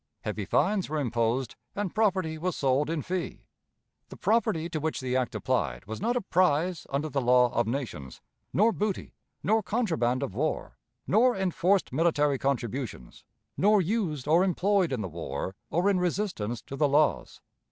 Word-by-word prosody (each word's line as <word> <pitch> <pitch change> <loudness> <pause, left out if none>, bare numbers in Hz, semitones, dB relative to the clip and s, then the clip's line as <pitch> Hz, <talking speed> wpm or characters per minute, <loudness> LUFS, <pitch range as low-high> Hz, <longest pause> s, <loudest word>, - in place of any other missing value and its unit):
Heavy - - -3
fines 200 -6 +1
were 155 - -2
imposed, 120 -1 0 0.2
and 200 -3 -2
property 190 -7 +1
was 175 +2 -2
sold 135 +2 +1
in 165 -3 -2
fee. 180 -1 -4 0.6
The - - -10
property 200 -8 +1
to 160 -2 -3
which 155 +1 -2
the 130 -1 -2
act 130 -2 0
applied - - -1
was 110 - -6
not 235 +4 +1
a 245 - +1
prize 175 -2 +1
under 140 +3 -1
the 140 -2 -1
law 125 0 +4
of 120 -1 +1
nations, 115 - -4 0.3
nor 220 +4 +4
booty, 210 -3 -3 0.3
nor 220 +3 +3
contraband 160 - 0
of 120 - -4
war, 150 +9 -2 0.3
nor 240 +3 +3
enforced 190 -2 +1
military 150 -3 +2
contributions, 125 - -3 0.3
nor 210 +2 +4
used 175 - -1
or 165 +4 +5
employed 190 -1 +2
in 125 -4 -1
the 95 - -3
war 85 +2 -5 0.2
or 175 +4 +1
in 200 -2 +3
resistance 175 - -2
to 140 - -7
the 145 0 +2
laws. 150 +1 +1
155 Hz, 165 wpm, -28 LUFS, 130-190 Hz, 0.6 s, or